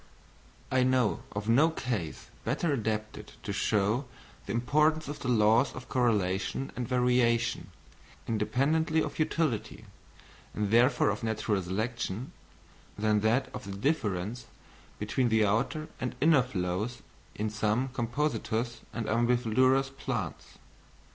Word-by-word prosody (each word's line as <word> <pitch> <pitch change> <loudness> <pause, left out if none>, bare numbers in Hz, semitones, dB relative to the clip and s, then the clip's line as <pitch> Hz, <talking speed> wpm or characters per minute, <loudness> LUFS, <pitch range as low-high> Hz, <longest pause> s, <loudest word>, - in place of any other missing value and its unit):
I 130 0 +3
know 125 -4 +2
of 105 +1 -4
no 135 +8 +5
case 120 - -4
better 165 -4 0
adapted 110 -3 -3
to - - -3
show 105 +5 +1 0.4
the - - -3
importance 150 +6 +2
of 145 - -5
the - - -5
laws 115 +2 +4
of 130 - -9
correlation 105 -1 0
and 125 -2 -3
variation, 125 -2 +2 0.6
independently 155 +9 +1
of - - -6
utility, 155 -7 -1 0.7
and 105 -1 -1
therefore 120 -2 +4
of 100 - -4
natural 110 -2 0
selection, 110 +4 -3 0.7
than 105 0 +2
that 110 +5 +1
of 125 - -6
the 100 0 -6
difference 110 - -1 0.5
between 120 +4 0
the 110 -1 +4
outer 120 +9 0
and 125 -1 -3
inner 155 -3 +5
flowers 105 0 -3 0.3
in 105 0 -2
some 110 +4 0
Compositous 120 -2 -2
and 115 -1 -4
Umbelliferous 125 +4 +2
plants. 135 - -5
120 Hz, 120 wpm, -29 LUFS, 105-130 Hz, 0.7 s, no